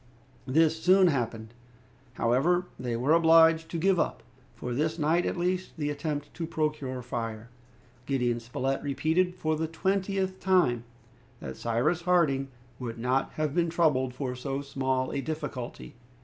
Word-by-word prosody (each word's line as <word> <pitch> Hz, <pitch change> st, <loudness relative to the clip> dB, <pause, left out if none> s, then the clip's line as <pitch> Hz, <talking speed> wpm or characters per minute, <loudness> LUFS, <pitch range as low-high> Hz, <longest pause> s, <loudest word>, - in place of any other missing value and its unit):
This 160 Hz, +3 st, +3 dB
soon 185 Hz, +1 st, +6 dB
happened. 115 Hz, -5 st, -3 dB, 0.6 s
However, 155 Hz, +10 st, +2 dB
they 120 Hz, -2 st, -2 dB
were 135 Hz, +6 st, +2 dB
obliged 165 Hz, 0 st, +5 dB
to 170 Hz, -, -3 dB
give 185 Hz, +2 st, +2 dB
up, -, -, -1 dB, 0.3 s
for 125 Hz, -, -4 dB
this 155 Hz, +5 st, 0 dB
night 165 Hz, +3 st, +2 dB
at -, -, -2 dB
least, 180 Hz, +1 st, -2 dB
the 145 Hz, -1 st, -1 dB
attempt 145 Hz, 0 st, -4 dB
to 165 Hz, -1 st, -4 dB
procure 150 Hz, -5 st, -2 dB
fire. 115 Hz, -1 st, -5 dB, 0.6 s
Gideon 125 Hz, -3 st, 0 dB
Spilett 125 Hz, +3 st, -2 dB
repeated, 160 Hz, +6 st, 0 dB
for 155 Hz, -3 st, -1 dB
the 160 Hz, +1 st, -2 dB
twentieth 190 Hz, +2 st, -1 dB
time, 170 Hz, -12 st, +2 dB, 0.5 s
that -, -, -7 dB
Cyrus 125 Hz, +9 st, 0 dB
Harding 160 Hz, -7 st, +2 dB, 0.3 s
would 120 Hz, -3 st, -5 dB
not 125 Hz, +3 st, 0 dB
have 155 Hz, -2 st, -1 dB
been 170 Hz, 0 st, +1 dB
troubled 145 Hz, -7 st, +1 dB
for 130 Hz, -1 st, -3 dB
so 135 Hz, +2 st, -4 dB
small 130 Hz, -2 st, -1 dB
a 140 Hz, -, -1 dB
difficulty. 150 Hz, -5 st, -5 dB
150 Hz, 150 wpm, -28 LUFS, 130-170 Hz, 0.6 s, soon